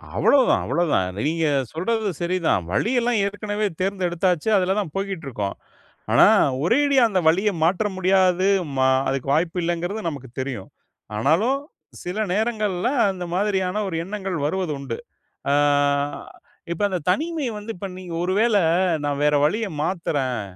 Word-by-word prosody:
அவ்வளவு 275 -2 +4
தான் - - +3
அவ்வளவு 170 +5 0
தான். 90 - +2 0.2
நீங்க 165 +1 0 0.3
சொல்றது 215 +5 -1
சரி 175 +2 0
தான். 95 - +2
வழியல்லாம் 235 - +1
ஏற்கனவே 205 +1 -2 0.2
தேர்ந்தெடுத்தாச்சு. 185 -1 0
அதுல 190 +1 +1
தான் 180 -7 -3
போய்க்கிட்டு 195 -5 -3
இருக்கோம். 105 -6 -3 0.6
ஆனா, - - +7 0.4
ஒரேடியா 280 +6 +3
அந்த 190 -3 +1
வழிய 195 +6 +2
மாற்ற 180 +5 +2
முடியாது. 185 0 +3 0.3
மா 130 0 +3 0.2
அதுக்கு 135 0 -3
வாய்ப்பு 165 +3 0
இல்லங்கிறது 175 +5 -2
நமக்குத் 135 -5 -10
தெரியும். 130 -8 -5 0.5
ஆனாலும் 195 - +2 0.4
சில 180 +5 -4
நேரங்கள்ல, 215 -3 0 0.2
அந்த 180 -2 -6
மாதிரியான 195 0 0
ஒரு 170 - -4
எண்ணங்கள் 195 -3 -4
வருவது 180 0 -1
உண்டு. 130 -4 -5 0.5
அ - - +3 1.2
இப்ப 170 - -4
அந்த 185 -2 -2
தனிமை 320 - -1
வந்து 210 +2 -6
இப்ப 195 +2 -6
நீங்க 180 -2 -8
ஒரு 185 +1 0
வேள, 225 -1 +3 0.5
நான் 145 0 -1
வேற 150 0 +3
வழிய 215 +7 0 0.2
மாத்துறேன், 145 - -1
185 Hz, 145 wpm, -23 LUFS, 160-210 Hz, 1.2 s, ஆனா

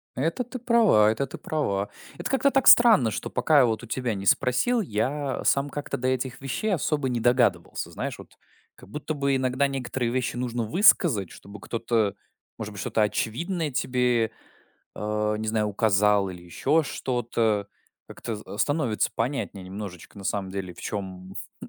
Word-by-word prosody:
Это 165 - -1
ты 255 +2 -8
права 230 - +4
это 125 +5 -1
ты 130 - -9
права. 100 -10 -2 0.3
Это - - -4
как-то 280 +1 +2
так 270 -2 +2
странно, 220 - +7
что - - -4
пока 155 -2 +3
я 130 - +6
вот 115 0 -1
у 120 - -9
тебя 125 -1 -2
не 95 -1 -5
спросил, 140 - +2
я 135 - -2
сам 140 +1 +2
как-то 145 +1 -4
до 130 - -2
этих 130 0 -2
вещей 135 +11 -1
особо 150 -4 0
не 120 -2 -1
догадывался. 120 -8 +1
Знаешь, - - -4
вот, - - -14 0.4
как - - -16
будто 150 +6 -4
бы 140 -2 0
иногда 130 +1 +1
некоторые 125 -3 -2
вещи 125 -1 -1
нужно 120 -1 -2
высказать, 125 - +4
чтобы 100 +1 -12
кто-то, 110 0 -1 0.4
может 105 -1 -6
быть, 100 - -6
что-то 110 - 0
очевидное 155 - -2
тебе, 125 -3 +1 0.7
э, 105 0 -1
не 110 - -4
знаю, 110 -1 +1
указал 105 -1 +2
или 90 -1 -9
ещё 140 - +1
что-то. 115 -7 -1 0.4
Как-то 115 - -6
з 105 0 -10
становится 145 -7 +1
понятнее 115 -5 -3
немножечко, 95 0 -8
на 100 - -10
самом 95 -2 -2
деле, 95 -2 -5
в - - -13
чём 95 -2 -6 0.3
ну, - - -9
120 Hz, 170 wpm, -26 LUFS, 105-140 Hz, 0.7 s, странно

